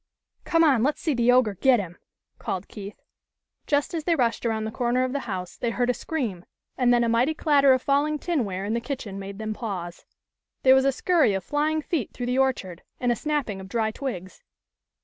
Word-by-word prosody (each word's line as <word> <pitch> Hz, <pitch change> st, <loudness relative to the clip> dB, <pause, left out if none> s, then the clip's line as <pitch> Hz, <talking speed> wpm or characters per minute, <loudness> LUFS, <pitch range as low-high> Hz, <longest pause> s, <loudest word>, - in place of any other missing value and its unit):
" -, -, -46 dB
Come 330 Hz, -1 st, +3 dB
on, 275 Hz, -8 st, +4 dB
let's 290 Hz, +5 st, +1 dB
see 310 Hz, -, 0 dB
the 245 Hz, -1 st, +3 dB
ogre 250 Hz, -4 st, +4 dB
get 250 Hz, +5 st, +3 dB
him," 175 Hz, -3 st, -6 dB, 0.4 s
called 190 Hz, 0 st, -4 dB
Keith. 205 Hz, -1 st, -10 dB, 0.6 s
Just 285 Hz, +3 st, +1 dB
as 325 Hz, -2 st, -2 dB
they 335 Hz, +1 st, +2 dB
rushed 240 Hz, -4 st, 0 dB
around 220 Hz, -1 st, -1 dB
the 220 Hz, -, -4 dB
corner 245 Hz, +1 st, 0 dB
of 255 Hz, 0 st, -2 dB
the 280 Hz, -, 0 dB
house 180 Hz, -2 st, -5 dB
they 240 Hz, -, -1 dB
heard 245 Hz, +1 st, +1 dB
a -, -, -2 dB
scream, 235 Hz, -, -4 dB, 0.3 s
and 250 Hz, -2 st, +3 dB
then 240 Hz, -1 st, +4 dB
a -, -, +1 dB
mighty 240 Hz, +7 st, +2 dB
clatter 280 Hz, -3 st, +4 dB
of 260 Hz, -1 st, +3 dB
falling 290 Hz, +2 st, +1 dB
tinware 220 Hz, -, -2 dB
in 210 Hz, -, -1 dB
the 235 Hz, -, -1 dB
kitchen 230 Hz, -6 st, -5 dB
made 195 Hz, 0 st, -7 dB
them 215 Hz, 0 st, -3 dB
pause. 185 Hz, -6 st, -6 dB, 0.6 s
There 260 Hz, -, +7 dB
was 265 Hz, 0 st, +4 dB
a 275 Hz, -, +4 dB
scurry 300 Hz, -, +2 dB
of 190 Hz, -, -3 dB
flying 305 Hz, -, 0 dB
feet 290 Hz, -, -2 dB
through 245 Hz, -, -4 dB
the 250 Hz, +2 st, 0 dB
orchard, 195 Hz, -10 st, -1 dB, 0.2 s
and 245 Hz, -1 st, +1 dB
a -, -, +2 dB
snapping 275 Hz, -9 st, -2 dB
of 190 Hz, -, -10 dB
dry 220 Hz, 0 st, 0 dB
twigs. 200 Hz, -8 st, -6 dB
245 Hz, 220 wpm, -25 LUFS, 210-280 Hz, 0.6 s, There